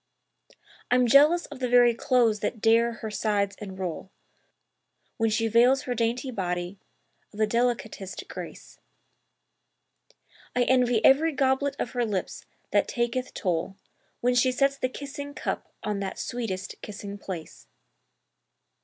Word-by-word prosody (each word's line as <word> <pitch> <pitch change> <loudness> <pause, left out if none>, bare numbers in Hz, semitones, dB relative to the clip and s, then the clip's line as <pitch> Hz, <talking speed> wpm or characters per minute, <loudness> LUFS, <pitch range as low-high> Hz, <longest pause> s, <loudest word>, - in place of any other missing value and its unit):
I'm 250 0 +4
jealous 295 +8 +5
of 290 - -10
the 250 -1 -1
very 245 -1 +6
clothes 235 -3 +2
that 225 - -3
dare 230 +2 +4
her 220 -1 -6
sides 205 -2 0
enroll 190 -3 -5 1.1
When 225 -1 +2
she 225 +1 +1
veils 245 +4 +4
her 250 - -2
dainty 240 +3 -1
body 180 -2 -3 0.5
of - - -14
the 215 - +3
delicatest 225 -4 -2
grace: - - -9 1.8
I 250 - +3
envy 245 -3 +3
every 310 +4 +5
goblet 270 0 +1
of - - -3
her 245 -2 0
lips 205 -5 -3 0.2
that - - +3
taketh 240 +1 -2
toll 180 0 -2 0.4
When 245 +1 +2
she 245 +1 +3
sets 275 +2 +2
the 255 - 0
kissing 285 +2 -7
cup - - -4
on 210 -1 -2
that 195 -1 -4
sweetest 215 -6 -4
kissing 205 -1 -7
place. 175 -5 -8
235 Hz, 135 wpm, -27 LUFS, 205-255 Hz, 1.8 s, very